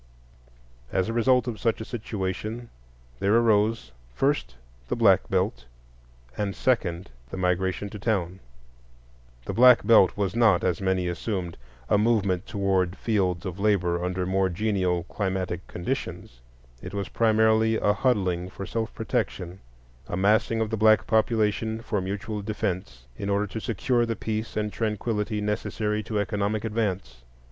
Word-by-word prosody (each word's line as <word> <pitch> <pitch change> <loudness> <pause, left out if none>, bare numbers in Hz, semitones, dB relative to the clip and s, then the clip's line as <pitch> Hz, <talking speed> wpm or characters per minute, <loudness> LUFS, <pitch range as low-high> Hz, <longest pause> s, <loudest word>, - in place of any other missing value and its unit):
As 95 +1 +1
a - - -2
result 125 +2 +3
of 115 -3 -4
such 115 - 0
a 110 - -5
situation, 110 +1 -4 0.5
there 100 +3 +2
arose, 115 -1 +2 0.2
first, 140 - 0 0.3
the - - -1
Black - - +4
Belt; - - 0 0.7
and, 100 +2 -2
second, 95 - 0 0.2
the 95 - -6
Migration 95 +2 0
to 105 - -7
Town. 95 -4 -1 1.1
The - - -3
Black 125 0 +6
Belt 105 -6 +5
was 100 0 -1
not, 110 -6 +4
as 90 +1 0
many 95 -1 0
assumed, 90 0 -3 0.3
a 105 - +3
movement 105 -5 +1
toward 95 -3 0
fields 95 -5 0
of 95 0 -5
labor 90 -4 +1
under 90 0 -1
more 95 0 +1
genial 90 -2 0
climatic 95 -2 -3
conditions; - - -5 0.4
it 95 +2 -7
was 100 -1 -2
primarily 110 0 +3
a 105 -1 +2
huddling 95 -8 0
for 95 - -7
self 115 +1 -3
protection,—a - - -5
massing 110 +3 +2
of 110 0 -1
the 110 - -1
black 110 0 +5
population 110 0 +1
for 110 -3 -2
mutual 100 +3 -4
defence 90 - -4
in 100 - -3
order 100 +1 +1
to 105 +3 -6
secure 120 +2 0
the 115 - -1
peace 110 0 -4
and 105 -1 -1
tranquillity 105 -1 -2
necessary 105 0 -1
to 110 0 -4
economic 105 +1 -1
advance. 100 - -2
105 Hz, 145 wpm, -26 LUFS, 90-110 Hz, 1.1 s, Black